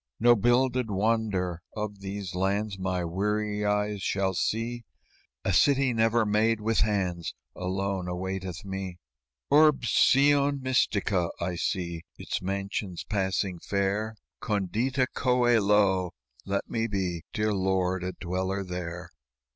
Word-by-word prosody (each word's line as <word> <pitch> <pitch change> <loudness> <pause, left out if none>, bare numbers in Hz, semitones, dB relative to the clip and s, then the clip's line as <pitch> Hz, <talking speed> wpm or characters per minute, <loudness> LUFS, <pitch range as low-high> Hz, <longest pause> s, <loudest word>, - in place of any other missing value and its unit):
"No 120 +1 +6
builded 120 +2 +2
wonder 100 -4 0
of 105 -2 -4
these 100 -1 -5
lands 95 +2 -1
My 95 -1 -1
weary 105 +4 -1
eyes 105 0 0
shall 95 -1 0
see; 115 +5 -1 0.6
A 95 - +1
city 135 +4 +4
never 115 0 +3
made 110 +2 +2
with 110 +1 0
hands 95 -5 0 0.2
Alone 95 0 -2
awaiteth 95 0 -4
me 95 -2 -5 0.5
"'Urbs 145 -5 +5
Syon 140 +2 +4
mystica;' 105 -8 +1
I 90 +1 -2
see 85 -1 -2 0.2
Its - - -4
mansions 95 -1 -3
passing 95 -3 -1
fair, 100 +4 -1 0.3
'Condita 115 +6 0
coelo;' 105 -7 +3 0.3
let 100 0 -2
me 115 0 -1
be, 95 -5 -2
Dear 105 0 0
Lord, 95 -1 0
a 90 0 -3
dweller 95 +2 -2
there!" 90 -1 -6
100 Hz, 120 wpm, -28 LUFS, 95-110 Hz, 0.6 s, No